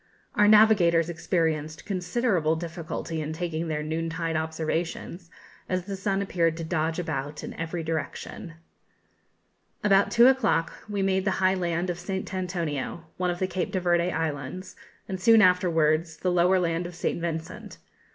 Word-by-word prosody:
Our 210 0 +4
navigators 200 -6 +5
experienced 160 -3 -1
considerable 180 -3 0
difficulty 165 -1 -5
in 155 +1 -4
taking 165 -1 -3
their 150 -1 -2
noon 160 +2 -2
tide 165 0 -2
observations, 160 +2 -3 0.4
as 185 -1 -1
the 200 0 -4
sun 195 0 -1
appeared 165 -4 0
to 165 - -4
dodge 160 0 -1
about 150 -4 -4
in - - -6
every 165 +1 -4
direction. 165 +1 -5 1.3
About 200 -1 +4
two 235 +1 +6
o'clock 260 -10 +3 0.2
we 200 -1 -1
made 190 0 +1
the 205 - +1
high 185 0 +3
land 175 -1 -1
of 175 - -6
St. 190 +1 -4
Antonio, 170 -4 -3
one 180 -1 0
of 175 - -2
the 185 - 0
Cape 185 -1 -3
de 190 - 0
Verde 175 0 +2
Islands, 160 +3 -4 0.3
and, 190 -1 -5
soon 225 +2 +6
afterwards, 165 -4 +3
the 180 - 0
lower 180 +2 +4
land 170 0 -1
of 175 - -10
St 170 - -2
Vincent. 165 -1 -5
170 Hz, 160 wpm, -26 LUFS, 160-185 Hz, 1.3 s, two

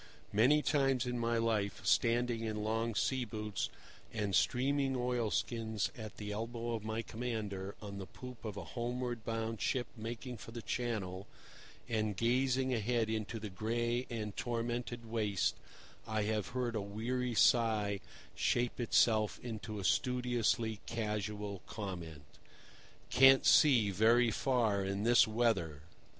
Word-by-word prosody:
Many 130 +9 +5
times 135 -3 +2
in 125 -1 -2
my 115 0 +1
life, 110 -4 0
standing 120 0 +2
in 105 -1 -2
long 115 +1 -1
sea 130 +4 +1
boots 105 -3 -3 0.4
and 105 -3 -2
streaming 135 +5 +2
oilskins 115 -3 -1
at 110 -4 -8
the 105 -1 -5
elbow 115 +2 -3
of 115 -2 -3
my 110 +1 -2
commander 105 -5 -4
on 100 -1 -6
the 95 - -6
poop 125 -1 -10
of 105 -3 -5
a - - -4
homeward 120 -1 -3
bound 115 -1 -3
ship 125 -2 0
making 120 +2 -6
for 110 - -10
the 120 -1 -6
Channel, 100 -5 -3 0.6
and 110 -3 -1
gazing 130 +3 +2
ahead 115 0 0
into 110 +1 -3
the 105 -2 -6
gray 120 +4 -1
and 105 -3 -4
tormented 120 0 -3
waste, 110 -4 0 0.5
I 110 -1 0
have 105 -1 -1
heard 125 -2 -2
a 110 - 0
weary 120 +5 -2
sigh 110 -4 +3 0.3
shape 120 +1 0
itself 110 -2 +3
into 110 -2 -5
a 100 - -4
studiously 120 0 +1
casual 105 -3 -3
comment: 85 -8 -6 0.9
"Can't 135 0 +7
see 120 -9 +6
very 115 +4 +4
far 110 -5 +1
in 100 +1 -2
this 120 0 +6
weather." 110 -10 0
115 Hz, 135 wpm, -34 LUFS, 105-120 Hz, 0.9 s, Can't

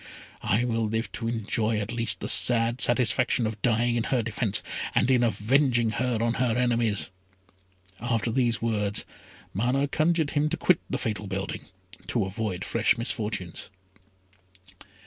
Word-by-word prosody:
I 110 +5 +1
will 115 -2 -1
live 110 +2 -2
to 115 - -5
enjoy 110 -1 -1
at 105 +1 -3
least 115 -1 0
the - - -3
sad 120 0 +5
satisfaction 120 0 +3
of 110 -1 -4
dying 120 0 +1
in 115 - -1
her 125 -3 0
defence, 110 -2 0 0.3
and 130 - +3
in 125 -2 +3
avenging 120 +2 +2
her 125 +1 -1
on 115 0 +1
her 120 -2 +1
enemies!" 115 -8 0 0.9
After 115 -1 -1
these 120 -3 0
words, 105 -3 0 0.5
Mana 125 +7 0
conjured 160 +1 +1
him 150 0 +1
to 170 - -2
quit 175 +1 +3
the 135 - -1
fatal 105 -6 -4
building 95 0 -5 0.4
to 115 -5 0
avoid 95 -2 -4
fresh 115 +2 +2
misfortunes. 105 -7 -3
115 Hz, 145 wpm, -26 LUFS, 110-125 Hz, 0.9 s, sad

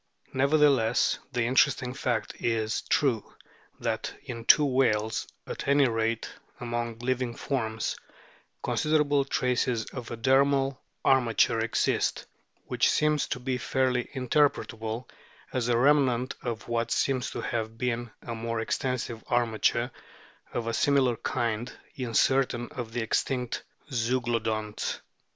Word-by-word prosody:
Nevertheless, 140 -4 +3
the 125 -2 0
interesting 125 0 +2
fact 120 -4 -1
is 110 -1 0
true, 125 -7 +1 0.4
that - - -2
in 115 -2 -7
two 150 - +7
whales, 115 -5 +1 0.2
at - - -6
any 140 -1 +5
rate, 115 -1 -1 0.3
among 120 -1 -3
living 125 0 -1
forms, 110 -5 -2 0.7
considerable 150 -2 +2
traces 125 -3 0
of 125 -3 -6
a 120 - -5
dermal 135 +2 +3 0.3
armature 120 -3 +3
exist, 115 0 0 0.4
which - - +2
seems 150 -1 +2
to - - -3
be 125 0 -2
fairly 130 -2 +1
interpretable 125 -4 0 0.5
as 125 -2 0
a 120 - +3
remnant 130 -2 +3
of 115 -3 -4
what 115 0 -1
seems 130 -1 +1
to - - -5
have 115 -2 -3
been 120 -1 -2
a 115 - -5
more 115 0 -3
extensive 120 0 -2
armature 120 0 +1 0.6
of 120 - -2
a 115 - -2
similar 135 -1 +3
kind 120 0 -2 0.2
in 125 -4 -4
certain 130 -2 +2
of 120 -3 -6
the 120 +1 -2
extinct 125 +2 -1 0.3
Zeuglodonts. 115 -3 -1
120 Hz, 125 wpm, -28 LUFS, 115-130 Hz, 0.7 s, two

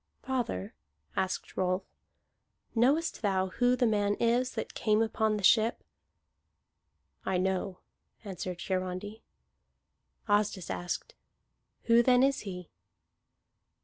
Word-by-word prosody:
"Father," 245 - -2 0.4
asked 190 - -2
Rolf, 185 0 0 0.9
"knowest 280 +8 +2
thou 190 -3 +1
who 245 +6 +2
the 250 - +2
man 205 -2 +2
is 240 +3 +1
that - - -4
came 215 -1 +2
upon 220 -1 +1
the 205 - -6
ship?" 220 +4 +4 1.4
"I 190 - 0
know," 190 0 -1 0.4
answered 185 -3 -5
Hiarandi. 185 +3 -3 1.1
Asdis 205 - +1
asked: 90 -1 -4 0.7
"Who 230 0 +5
then 250 +1 +4
is 275 0 +2
he?" 180 -4 -7
205 Hz, 105 wpm, -30 LUFS, 185-235 Hz, 1.4 s, Who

